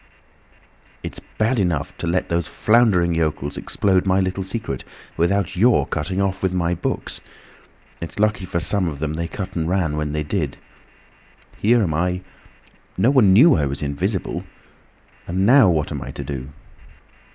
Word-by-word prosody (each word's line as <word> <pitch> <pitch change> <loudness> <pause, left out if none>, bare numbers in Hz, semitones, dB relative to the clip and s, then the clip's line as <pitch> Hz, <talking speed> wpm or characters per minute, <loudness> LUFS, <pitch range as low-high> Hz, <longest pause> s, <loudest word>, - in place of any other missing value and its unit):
"It's - - -4 0.2
bad 115 +3 +1
enough 85 -7 -1
to 85 - -3
let 90 +2 0
these 85 -1 0
floundering 105 -7 +3
yokels 75 -3 -1
explode 95 -1 0
my 95 0 +3
little 95 0 -1
secret, 95 - -3 0.3
without 90 +2 0
your 100 - +4
cutting 95 +6 -3
off 95 -1 -1
with 95 -1 0
my 85 -1 +1
books. 85 - -4 0.8
It's 85 - -7
lucky 105 -2 +1
for 90 -1 -2
some 90 +2 +2
of 75 -4 -4
them 75 +1 -3
they 85 +1 -3
cut 95 +2 -6
and 80 -1 -1
ran 85 -5 0
when 75 -1 -2
they 75 0 -2
did! 75 -3 -2 1.0
Here 115 +2 +3
am 80 -5 -1
I... 90 +3 0 0.8
No 125 - +4
one 120 -9 +5
knew 135 - +7
I 75 - +1
was 70 +2 -4
invisible! 90 +8 -2 0.8
And 95 +3 0
now 125 -2 +7
what 80 -3 0
am 70 -3 -4
I - - -7
to - - -6
do?" 65 -2 -6
90 Hz, 165 wpm, -21 LUFS, 80-100 Hz, 1.0 s, knew